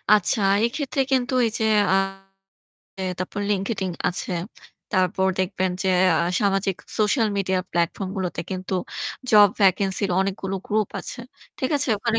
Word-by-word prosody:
আচ্ছা 210 +2 +1 0.2
এক্ষেত্রে 270 +2 -1
কিন্তু 260 0 +1
এই - - +1
যে - - 0 0.3
আ - - +5 1.2
তারপর 185 +3 -4
LinkedIn 195 -1 -1 0.2
আছে। 180 - -4 0.6
তারপর 185 0 +2
দেখবেন 185 0 0
যে 190 - 0 0.3
আ - - +2 0.2
সামাজিক 195 -2 +1 0.2
সোশ্যাল 220 +2 +2
মিডিয়া 190 -1 +1
প্লাটফর্ম 170 +3 -1
গুলোতে 185 -2 -2
কিন্তু 185 0 -3 0.6
জব 210 -1 +8
ভ্যাকেন্সি 195 0 +3
এর - - -5
অনেকগুলো 195 0 -2
গ্রুপ 215 -1 0
আছে। 245 - -6 0.4
ঠিক 260 - -1
আছে? 285 -1 0
ওখানে 230 +1 0
195 Hz, 140 wpm, -23 LUFS, 185-220 Hz, 1.2 s, জব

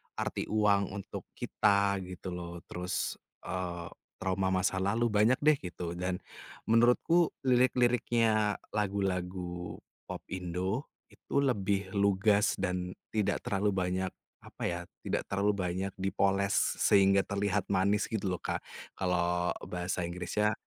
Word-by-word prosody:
arti - - -2
uang 100 -2 +2
untuk 100 - -7
kita 100 0 +2
gitu 90 +1 -7
loh, 85 -1 -6
terus, 90 +1 -2 0.3
eee, 90 -2 -4 0.3
trauma 95 0 0
masa 95 +1 +1
lalu, 110 +5 +1
banyak, 110 +4 +3
deh, 150 -1 +5
gitu. 85 -3 -5
Dan 90 0 -2 0.5
menurutku 125 +9 +4
lirik-liriknya 120 -4 +3
lagu-lagu 90 -4 -2 0.2
popindo, 95 +7 -3 0.2
itu 140 - -2
lebih 100 -7 0
lugas 100 +1 +3
dan 90 -1 -1 0.2
tidak 105 -3 0
terlalu 100 0 0
banyak 95 0 -1 0.3
apa - - -9
ya, 90 0 -3 0.2
tidak - - -2
terlalu 100 +1 +1
banyak 95 +1 -2
dipoles 100 +1 +1 0.2
sehingga 100 -1 +5
terlihat 100 -1 0
manis 100 +2 +2
gitu 105 -4 -1
loh 90 -2 -3
kak, - - -2 0.4
kalau 90 -1 +1
bahasa 90 0 -2
Inggrisnya 90 +5 0
95 Hz, 120 wpm, -31 LUFS, 90-105 Hz, 0.5 s, deh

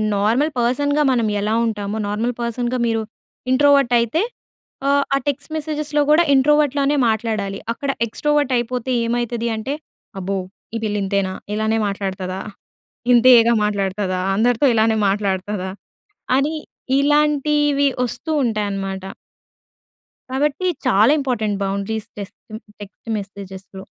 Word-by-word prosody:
Normal 230 +10 +2
పర్సన్‌గా 285 +5 +1
మనం 235 -3 +1
ఎలా 210 +2 0
ఉంటామో, 210 -1 -3
నార్మల్ 225 +4 -1
పర్సన్‌గా 240 +1 -2
మీరు 225 -1 0 0.5
ఇంట్రోవర్ట్ 275 -2 +4
అయితే, 235 - 0 0.9
ఆ - - +3
టెక్స్ట్ 285 +2 -3
మెసేజెస్‌లో 300 -1 -1
కూడా 335 +3 +6
ఇంట్రోవర్ట్‌లానే 290 0 +3
మాట్లాడాలి. 215 -3 -2
అక్కడ 280 +4 -5 0.2
ఎక్స్ట్రోవర్ట్ 295 +3 0
అయిపోతే 250 +1 -2
ఏమైతది 235 0 -1
అంటే 260 +6 -3 0.4
అబ్బో! 195 +1 -2 0.4
ఈ - - +1
పిల్ల 210 -1 -1
ఇంతేనా, 195 -1 0 0.2
ఇలానే 220 +1 0
మాట్లాడుతదా, 190 -2 -4 0.7
ఇంతియగా 235 -1 +6
మాట్లాడుతదా, 195 -2 -1
అందరితో 240 +5 +2
ఇలానే 220 0 +3
మాట్లాడుతదా 195 -1 -1 0.7
అని 290 +4 +1 0.4
ఇలాంటివి 295 0 +2 0.2
వస్తూ 285 +6 -5
ఉంటాయన్నమాట. 195 -4 -2 1.3
కాబట్టి 295 +6 0 0.2
చాలా 210 +7 +5
ఇంపార్టెంట్ 220 -7 -1
బౌండరీస్ 200 +3 -3
టెస్ట్ 200 -1 -8 0.4
టెక్స్ట్ 205 +3 -11
మెసేజెస్‌లో. 195 -1 -9
230 Hz, 110 wpm, -20 LUFS, 200-280 Hz, 1.3 s, కూడా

